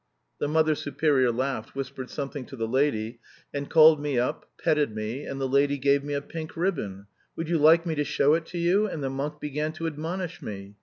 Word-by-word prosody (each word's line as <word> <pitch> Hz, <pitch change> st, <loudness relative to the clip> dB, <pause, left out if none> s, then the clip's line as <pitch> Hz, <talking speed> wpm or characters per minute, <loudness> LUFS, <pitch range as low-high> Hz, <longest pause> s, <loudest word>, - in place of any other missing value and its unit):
The -, -, 0 dB
Mother 155 Hz, +1 st, +3 dB
Superior 145 Hz, -4 st, +1 dB
laughed, 130 Hz, -1 st, -3 dB
whispered 135 Hz, -1 st, -5 dB
something 140 Hz, -1 st, -5 dB
to -, -, -9 dB
the 115 Hz, -3 st, -2 dB
lady 115 Hz, -3 st, 0 dB, 0.3 s
and 140 Hz, 0 st, -4 dB
called 155 Hz, -1 st, +7 dB
me 145 Hz, -3 st, -1 dB
up, 120 Hz, +1 st, -1 dB
petted 145 Hz, -7 st, +1 dB
me, 110 Hz, +6 st, -4 dB
and 135 Hz, -, -5 dB
the 135 Hz, -, 0 dB
lady 140 Hz, +2 st, +2 dB
gave 140 Hz, +1 st, +2 dB
me 145 Hz, 0 st, -3 dB
a 140 Hz, -, -2 dB
pink 160 Hz, +1 st, -7 dB
ribbon. 120 Hz, -, -2 dB, 0.3 s
Would 165 Hz, -, -4 dB
you 165 Hz, -1 st, +1 dB
like 165 Hz, +3 st, +6 dB
me 165 Hz, -, -1 dB
to 150 Hz, -1 st, 0 dB
show 145 Hz, +1 st, +3 dB
it 165 Hz, 0 st, 0 dB
to 180 Hz, -, -6 dB
you? 180 Hz, +5 st, +3 dB
And 160 Hz, -7 st, -5 dB
the 135 Hz, -, -1 dB
monk 145 Hz, +3 st, -4 dB
began 150 Hz, +1 st, -2 dB
to 165 Hz, +1 st, -5 dB
admonish 165 Hz, +3 st, -4 dB
me. 100 Hz, -1 st, -7 dB
145 Hz, 215 wpm, -27 LUFS, 130-160 Hz, 0.3 s, called